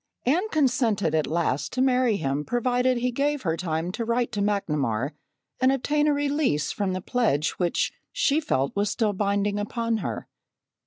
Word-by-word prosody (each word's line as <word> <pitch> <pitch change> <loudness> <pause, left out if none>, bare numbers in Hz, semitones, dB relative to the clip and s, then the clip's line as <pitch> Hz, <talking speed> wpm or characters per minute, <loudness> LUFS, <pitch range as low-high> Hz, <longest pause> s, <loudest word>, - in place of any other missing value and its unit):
Anne 350 - +2
consented 245 - +1
at 155 -1 +1
last 150 -2 -1
to 255 - -4
marry 255 -4 +3
him 140 -2 -1
provided 245 +3 +1
he 250 +1 0
gave 285 +3 0
her 165 -4 0
time 165 0 -2
to 230 +5 -3
write 235 +1 0
to 205 -3 -2
McNamar 150 - 0 0.5
and 260 0 +4
obtain 295 +3 +1
a 300 - +4
release 285 - 0
from 200 -3 -1
the 185 - -3
pledge 195 - +1
which 175 -2 0 0.2
she 290 +2 +2
felt 135 - -1
was 205 0 +1
still 215 -2 0
binding 200 +1 0
upon 230 +2 -1
her. 215 - -4
215 Hz, 170 wpm, -25 LUFS, 170-255 Hz, 0.5 s, and